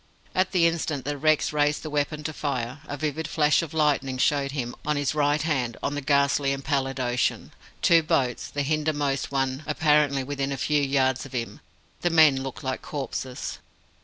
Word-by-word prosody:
At 185 0 +1
the 180 -3 +3
instant 160 -5 -1
that 145 0 -3
Rex 155 0 +2
raised 150 0 +1
the 155 - -5
weapon 150 +1 -1
to 155 - -3
fire, 130 -3 -3
a 145 - -5
vivid 155 +2 -2
flash 150 0 +3
of 165 -3 -6
lightning 145 -4 +1
showed 140 +1 +1
him, 125 -4 -3
on 150 0 0
his 145 -2 0
right 145 0 +1
hand, 130 -8 -1
on - - -1
the 145 - -3
ghastly 140 0 +2
and 135 0 -6
pallid 135 -2 -1
ocean, 125 -1 -1 0.3
two 170 -1 +6
boats, 130 -6 0
the 145 - -2
hindermost 145 -2 -1
one 135 0 -1
apparently 150 -3 +2
within 140 0 -3
a 135 - -2
few 150 +3 +1
yards 135 -2 +1
of - - -17
him. 120 -2 -4 0.4
The 175 - +2
men 155 -5 +5
looked 135 +3 -6
like 130 -1 -3
corpses. 130 -3 -5
145 Hz, 190 wpm, -25 LUFS, 135-150 Hz, 0.4 s, two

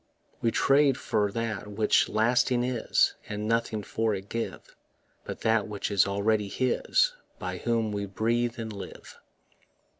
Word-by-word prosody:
We 115 - +3
trade 135 +2 +3
for 105 -1 0
that 115 -2 -3
which 105 +1 +2
lasting 120 +3 +2
is, 125 -2 +2 0.2
And 105 0 -3
nothing 115 -2 0
for 110 +1 0
it 95 +1 -8
give 115 0 -5 0.5
But - - -6
that 110 -2 +2
which 105 -1 -4
is 100 -1 +4
already 105 +1 +1
His 130 - +1 0.2
By - - -4
whom 115 -2 0
we 100 -1 -3
breathe 115 +4 0
and 110 -2 -5
live. 100 - -10
110 Hz, 145 wpm, -28 LUFS, 105-120 Hz, 0.5 s, is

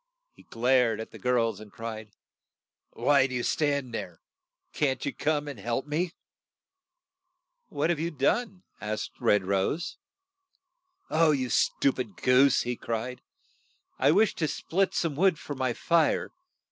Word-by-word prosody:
He - - -18
glared 120 -1 +2
at 110 - -7
the - - -11
girls, 115 -4 +1
and 110 -1 -12
cried, 110 -1 -7 0.8
"Why 140 -2 +3
do 130 - -5
you 120 - -1
stand 140 -5 0
there? 90 -6 -6 0.5
Can't 135 -4 0
you - - -2
come 150 -1 -1
and 140 -6 -7
help 120 +5 -2
me?" 165 +4 -2 1.5
What 155 +4 0
have 165 - -1
you 165 +2 -1
done? 180 - -1
' - - -51
' - - -31
asked 105 +1 -4
Red 105 -5 +3
Rose. 100 - -1 1.1
'You 150 -6 +3
stu 140 - +2
pid 115 -7 -6
goose!" 125 +2 +4
he 125 0 -2
cried. 115 +2 -4 0.8
"I 135 - +4
wished 205 +7 +3
to 160 - +1
split 190 +5 -1
some 165 -4 0
wood 180 +1 +3
for 145 - -6
my 130 -2 -1
fire. 165 +5 +1
130 Hz, 150 wpm, -28 LUFS, 115-155 Hz, 1.5 s, goose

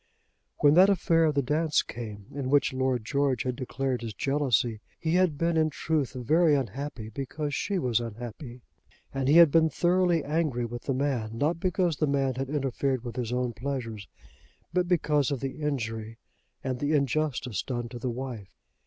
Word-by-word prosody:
When 145 -1 +5
that 185 +4 +7
affair 165 -4 +3
of 155 -2 +1
the 140 - +2
dance 150 +4 +1
came, 105 -4 -8
in 135 -2 -3
which 140 -1 +3
Lord 130 -3 0
George 140 0 +1
had 125 -1 -2
declared 130 -1 -2
his 115 -4 -6
jealousy, 125 -4 +1 0.2
he 160 0 -1
had 180 -5 +3
been 170 +2 +1
in 155 0 +3
truth 150 -2 -1
very 150 +5 +3
unhappy 130 -2 -4
because 145 +5 -4
she 200 +7 -1
was 125 -8 +1
unhappy, 120 +2 -7 0.5
and 135 -1 -1
he 150 +4 +6
had 170 -4 +8
been 160 0 +4
thoroughly 175 -1 +2
angry 150 -6 0
with 120 +1 -7
the 135 - 0
man, 125 -5 -1
not 155 +6 0
because 180 -3 0
the 155 - +1
man 135 -2 +1
had 130 +1 -4
interfered 135 -3 -1
with 120 -2 -6
his 120 -2 -3
own 125 -1 -1
pleasures, 115 -5 -4 0.7
but 180 0 +1
because 150 -6 +2
of 140 -3 -2
the 135 +4 -5
injury 115 -6 -3 0.5
and 130 -2 -2
the 145 +3 0
injustice 140 - 0
done 120 -2 -4
to 120 0 -8
the 125 - -2
wife. 120 -5 -6
135 Hz, 180 wpm, -28 LUFS, 120-155 Hz, 0.7 s, had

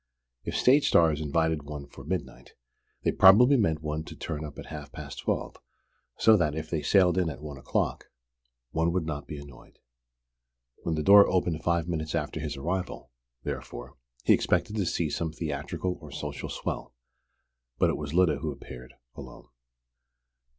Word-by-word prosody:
If - - -3
stage 140 +3 +5
stars 80 -2 +4
invited 80 +1 0
one 70 0 -7
for 70 - -13
midnight, 75 -9 -5 0.5
they - - +2
probably 120 +9 +7
meant 80 - +1
one 75 0 -2
to - - -9
turn 75 -1 -5
up 75 -2 -8
at - - -8
half 75 -2 -8
past - - -8
twelve, - - -2 0.6
so 110 - +6
that, 75 -5 0
if 80 0 -5
they 80 -3 0
sailed 90 +3 +4
in 90 -3 +1
at 75 - -7
one 75 -2 -8
o'clock, 70 - -2 0.6
one 80 +3 +1
would 90 -3 0
not 75 -2 -5
be 75 - -6
annoyed. 70 -3 -13 1.0
When 80 - -1
the 75 - -1
door 100 +4 +8
opened 85 -3 0
five 85 -1 +1
minutes 80 -2 -2
after - - -2
his - - -4
arrival, 90 -4 -4 0.3
therefore, 65 +4 -6 0.3
he - - +6
expected 105 - +1
to 95 -4 0
see 85 - 0
some 80 -2 -2
theatrical 80 +3 -4
or 75 - -10
social 70 0 -5
"swell." 65 - -5 0.8
But - - +3
it - - -3
was 75 -1 -5
Lyda 90 0 +3
who - - -3
appeared 60 0 -11 0.2
alone. - - -11
80 Hz, 170 wpm, -28 LUFS, 75-90 Hz, 1.0 s, door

